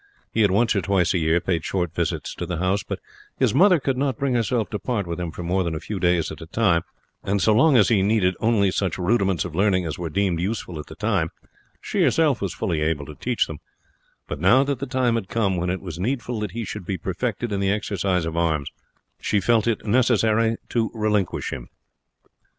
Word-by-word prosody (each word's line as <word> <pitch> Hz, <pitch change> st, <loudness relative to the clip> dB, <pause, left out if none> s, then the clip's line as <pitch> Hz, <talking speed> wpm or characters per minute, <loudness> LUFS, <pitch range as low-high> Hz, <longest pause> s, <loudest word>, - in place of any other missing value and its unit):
He 115 Hz, -, +1 dB
had 105 Hz, -, +5 dB
once 110 Hz, +4 st, +2 dB
or 100 Hz, -, +2 dB
twice 90 Hz, 0 st, +1 dB
a 90 Hz, -, +1 dB
year 80 Hz, +1 st, +2 dB
paid 85 Hz, -2 st, -1 dB
short 90 Hz, -4 st, -2 dB
visits -, -, -2 dB
to 85 Hz, -, -5 dB
the 90 Hz, -1 st, -3 dB
house, 95 Hz, +4 st, +1 dB
but -, -, -5 dB, 0.4 s
his -, -, +2 dB
mother 180 Hz, +4 st, +5 dB
could 135 Hz, -1 st, -1 dB
not 135 Hz, -4 st, 0 dB
bring 140 Hz, -2 st, 0 dB
herself 115 Hz, -1 st, +1 dB
to 105 Hz, -, -2 dB
part 115 Hz, -6 st, -2 dB
with 85 Hz, 0 st, -4 dB
him 90 Hz, -1 st, -3 dB
for 85 Hz, +2 st, -7 dB
more 90 Hz, +2 st, +1 dB
than 85 Hz, -2 st, -2 dB
a -, -, -3 dB
few 100 Hz, +4 st, -5 dB
days 90 Hz, -2 st, +1 dB
at -, -, -9 dB
a 80 Hz, -, -8 dB
time; 90 Hz, -3 st, +2 dB, 0.4 s
and 100 Hz, +1 st, 0 dB
so 100 Hz, +4 st, +4 dB
long 135 Hz, +5 st, +5 dB
as 105 Hz, -5 st, +5 dB
he 105 Hz, -4 st, +3 dB
needed 100 Hz, -2 st, +2 dB
only 110 Hz, -4 st, +2 dB
such 95 Hz, -3 st, -1 dB
rudiments 95 Hz, -3 st, +1 dB
of 90 Hz, -, -6 dB
learning 95 Hz, 0 st, +2 dB
as 80 Hz, 0 st, -4 dB
were 85 Hz, -2 st, -3 dB
deemed 95 Hz, 0 st, 0 dB
useful 90 Hz, -3 st, -3 dB
at 75 Hz, -, -8 dB
the -, -, -10 dB
time, 100 Hz, -6 st, 0 dB, 0.5 s
she -, -, -2 dB
herself 150 Hz, -8 st, +3 dB
was 100 Hz, -3 st, -1 dB
fully 85 Hz, -3 st, -2 dB
able 75 Hz, -2 st, 0 dB
to 75 Hz, -, -9 dB
teach 120 Hz, -, 0 dB
them; 80 Hz, -2 st, -8 dB, 0.7 s
but 75 Hz, -, -5 dB
now 110 Hz, -, +5 dB
that 140 Hz, -3 st, -2 dB
the 140 Hz, -, -4 dB
time 130 Hz, -2 st, +1 dB
had 115 Hz, -5 st, -2 dB
come 100 Hz, -5 st, +1 dB
when 90 Hz, 0 st, -1 dB
it 95 Hz, +1 st, -2 dB
was 85 Hz, -3 st, -7 dB
needful 120 Hz, +2 st, -2 dB
that 105 Hz, -1 st, -2 dB
he 115 Hz, 0 st, -3 dB
should 105 Hz, 0 st, -6 dB
be 95 Hz, +2 st, -3 dB
perfected 105 Hz, +6 st, -3 dB
in 100 Hz, -, -1 dB
the 100 Hz, -1 st, +1 dB
exercises 95 Hz, -4 st, 0 dB
of 80 Hz, 0 st, -4 dB
arms, 80 Hz, -4 st, 0 dB, 0.5 s
she 105 Hz, -, +1 dB
felt 115 Hz, +2 st, +2 dB
it 115 Hz, -3 st, -1 dB
necessary 115 Hz, -1 st, +2 dB
to 115 Hz, -2 st, 0 dB
relinquish 105 Hz, -4 st, 0 dB
him. -, -, -7 dB
100 Hz, 230 wpm, -23 LUFS, 85-115 Hz, 0.7 s, had